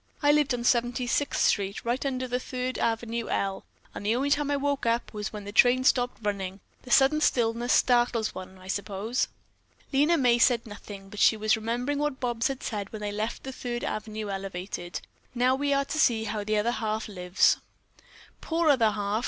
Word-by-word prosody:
"I 290 - +6
lived 295 -2 +3
on 240 - -5
Seventy 245 0 +1
sixth 280 +4 0
Street, 200 +1 0
right 240 +2 0
under 255 -2 -2
the 250 0 -1
Third 255 0 -4
Avenue 230 0 -1
L, 195 -1 -2 0.3
and - - -7
the 215 +3 +1
only 275 +3 0
time 290 0 +2
I 285 - +1
woke 280 -3 -1
up 230 +1 0
was 210 0 -4
when 210 -1 -7
the 205 - -7
trains 255 +4 +5
stopped 245 -1 0
running. 195 -2 -3 0.2
The 250 - -13
sudden 275 +5 +4
stillness 240 -2 +1
startles 240 -3 +3
one, 185 0 -9
I 185 0 -14
suppose." 200 +5 -2 0.7
Lena 300 +5 +4
May 245 -4 +3
said 235 -1 +3
nothing, 205 -2 -10
but 210 - -8
she 220 - +5
was 215 0 +2
remembering 240 +6 -2
what 295 -2 -1
Bobs 240 +1 0
had 270 -1 -5
said 205 -3 -4
when 215 - -7
they 210 - -2
had - - -6
left 215 +2 -3
the 265 - -5
Third 245 -2 -5
Avenue 215 0 -4
Elevated: 185 -2 -5 0.3
"Now 250 +2 +3
we 285 +2 0
are 275 0 +2
to 310 - -3
see 225 -6 +3
how 210 -1 -3
the 215 +1 0
'other 220 +3 +1
half' 220 -2 -2
lives." 180 -2 +2 0.8
"Poor 330 -1 +1
other 235 -6 +4
half!" 205 0 -1
235 Hz, 200 wpm, -27 LUFS, 210-255 Hz, 0.8 s, I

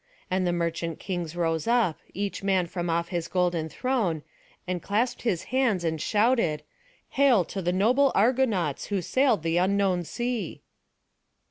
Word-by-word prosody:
And 185 -1 +1
the - - +2
merchant 170 -1 -2
kings 175 -4 -4
rose 165 -1 -1
up, 230 -9 +2
each 200 +1 -3
man 190 -2 +2
from 175 0 -4
off 170 +1 0
his 175 -2 -2
golden 175 -3 0
throne, 210 - -1 0.4
and 180 -1 -3
clasped 220 +8 -1
their 200 -7 +2
hands, 250 -9 +1
and 160 -2 -1
shouted: 210 -8 +2 0.5
"Hail 260 -9 +4
to 195 - -5
the 175 0 0
noble 250 +9 +3
Argonauts, 215 - +1
who 200 -3 -2
sailed 255 - +2
the 165 +1 +1
unknown 190 -1 +2
sea!" 240 0 -4
185 Hz, 150 wpm, -26 LUFS, 170-230 Hz, 0.5 s, Hail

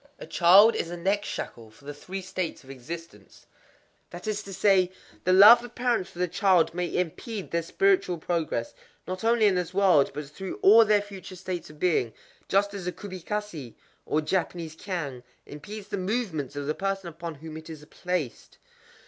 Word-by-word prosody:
_ - - -33
A - - -9
child 195 +6 +6
is 165 - -2
a 175 - -6
neck 195 +4 0
shackle 115 - -6
for 115 +6 -21
the 145 - -6
Three 190 +6 -7
States 185 -4 -4
of 135 - -12
Existence. 135 -5 -10 0.6
That 175 +1 -9
is 215 -1 -2
to 200 - -10
say, 190 -2 +3 0.3
The 185 - +3
love 210 +6 +9
of 245 -1 -11
parents 240 -6 0
for - - -17
their 180 0 0
child 185 -2 +3
may 180 0 -2
impede 190 +4 -3
their 170 - +1
spiritual 370 - +1
progress—not 170 - -4
only 230 -1 +3
in 200 - +5
this 180 0 -2
world, 185 -8 +4
but 150 0 -4
through 190 +5 -6
all 225 +3 +8
their 210 -1 +3
future 195 -3 -10
states 180 -2 -5
of 150 0 -15
being,—just 185 - -1
as 190 -3 -6
a - - 0
kubikasé, 185 - -6 0.3
or 155 - +1
Japanese 165 -1 -2
cangue, 160 -9 -5 0.2
impedes 205 +8 -9
the 200 - -3
movements 185 - -2
of 145 0 -4
the 150 - 0
person 195 0 -3
upon 170 0 -7
whom 155 +2 -10
it 160 +1 -9
is 155 -2 -9
placed. 175 -5 -4
180 Hz, 180 wpm, -27 LUFS, 160-200 Hz, 0.6 s, love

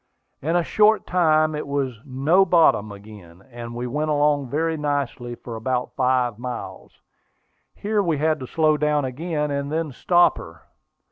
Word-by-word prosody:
In 160 +5 -1
a 175 - +3
short 215 +4 +3
time 155 -3 +2
it 150 - -5
was 135 -5 -2
"No 145 +8 +2
bottom" 165 - +3
again; 100 -4 -13
and 120 0 -8
we 120 +1 -4
went 150 +5 -2
along 145 -2 +1
very 160 +4 -1
nicely 140 -5 -3
for 115 -1 -9
about 125 +2 -3
five 125 -3 +1
miles. 125 -1 -8 0.7
Here 210 0 -1
we 165 -6 0
had 155 +1 +1
to 130 - -7
slow 155 +1 +2
down 150 -1 +1
again, 150 +3 -3
and 140 0 -3
then 160 -1 -2
stop 175 +7 +3
her. 80 0 -12
145 Hz, 160 wpm, -23 LUFS, 125-160 Hz, 0.7 s, a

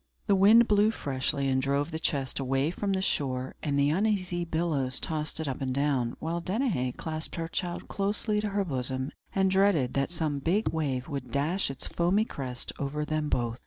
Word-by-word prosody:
The 205 - +3
wind 215 +5 +7
blew 210 +1 +4
freshly, 140 -6 -1
and 130 0 +2
drove 140 +4 0
the 160 - -3
chest 140 -4 -1
away 135 +3 +1
from 195 +2 -1
the 190 0 0
shore, 130 -6 -1
and 145 -2 0
the 140 +1 +3
uneasy 185 -2 +1
billows 160 -6 0
tossed 155 -1 -2
it 160 - -2
up 135 +1 -3
and 130 -1 -1
down; 135 -4 +1
while 170 +2 -2
Danaë 185 - -1
clasped 155 -1 -4
her 165 -1 -3
child 175 +1 -3
closely 210 +1 0
to 210 - -1
her 200 0 0
bosom, 130 -2 -2 0.2
and 190 -1 +3
dreaded 190 -10 +3
that 140 0 +1
some 155 -4 -1
big 185 +10 +1
wave 140 -5 -1
would 140 -5 -5
dash 155 +7 +1
its 135 - -6
foamy 185 +6 +2
crest 125 - -5
over 150 +2 -2
them 155 -1 -1
both. 120 -2 -1
155 Hz, 195 wpm, -29 LUFS, 135-190 Hz, 0.2 s, wind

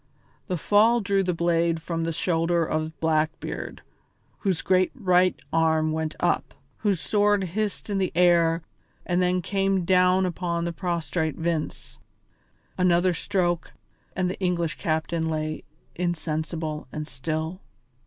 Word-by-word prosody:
The 180 -3 -1
fall 215 +8 +4
drew 200 -2 +1
the 185 -1 0
blade 170 -1 +1
from 165 0 -3
the 165 - -1
shoulder 165 0 +1
of 155 -1 -3
Blackbeard, 160 0 -1 0.6
whose 190 -5 0
great 185 -1 +3
right 185 -6 +3
arm 160 -1 +3
went 155 0 -2
up, - - 0 0.2
whose 200 -5 +1
sword 205 +2 +2
hissed 205 +3 -3
in 200 -2 -1
the 185 - 0
air 170 -2 +4 0.4
and 180 0 +1
then 180 0 +1
came 195 -1 +1
down 185 +1 +4
upon 170 -1 -2
the 170 - -2
prostrate 170 -3 -2
Vince. 165 -2 -3 0.8
Another 180 0 +3
stroke 175 -1 -1 0.4
and 185 0 +1
the 180 - -4
English 175 -4 -1
captain 160 +1 -1
lay 155 0 -3 0.3
insensible 160 -3 -3
and 155 0 -5
still. 155 +7 -4
170 Hz, 135 wpm, -25 LUFS, 160-185 Hz, 0.8 s, fall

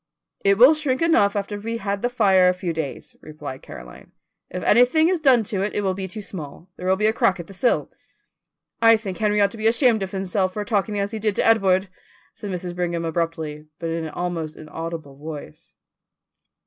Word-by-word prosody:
"It 200 0 +4
will 255 +7 +8
shrink 295 -4 -1
enough 220 -12 +3
after 205 0 -3
we 225 +3 -4
have 230 - -4
had 200 0 -2
the 245 - 0
fire 195 -6 +4
a 180 - 0
few 180 -2 -3
days," 155 -4 -6
replied 150 -4 -8
Caroline. 60 0 -12 0.4
"If 180 - -5
anything 250 +9 +4
is 365 -2 +1
done 260 -6 +4
to 195 -2 -3
it 205 - -2
it - - +1
will 190 -2 0
be 190 0 -5
too 205 +3 -7
small; 175 -1 -9
there 180 - -6
will 190 - +4
be 210 +2 0
a 220 - +4
crack 195 -5 +1
at 170 - -6
the 195 - -13
sill." 240 +6 0 0.9
"I 225 0 +7
think 195 -4 -6
Henry 210 -1 +2
ought 200 -1 +3
to 225 - -11
be 220 - +3
ashamed 230 -1 +3
of 190 - -3
himself 190 -1 -1
for 210 +1 -4
talking 205 0 -1
as 200 +1 -2
he 220 - -4
did 210 -1 0
to - - +1
Edward," 195 -4 +3 0.5
said 205 - -8
Mrs. 180 -1 -4
Brigham 170 -1 -2
abruptly, 160 -2 -3
but 165 -1 -4
in 165 0 -3
an - - -5
almost 165 -2 -4
inaudible 160 -2 -7
voice. 150 - -9
195 Hz, 215 wpm, -23 LUFS, 170-215 Hz, 0.9 s, will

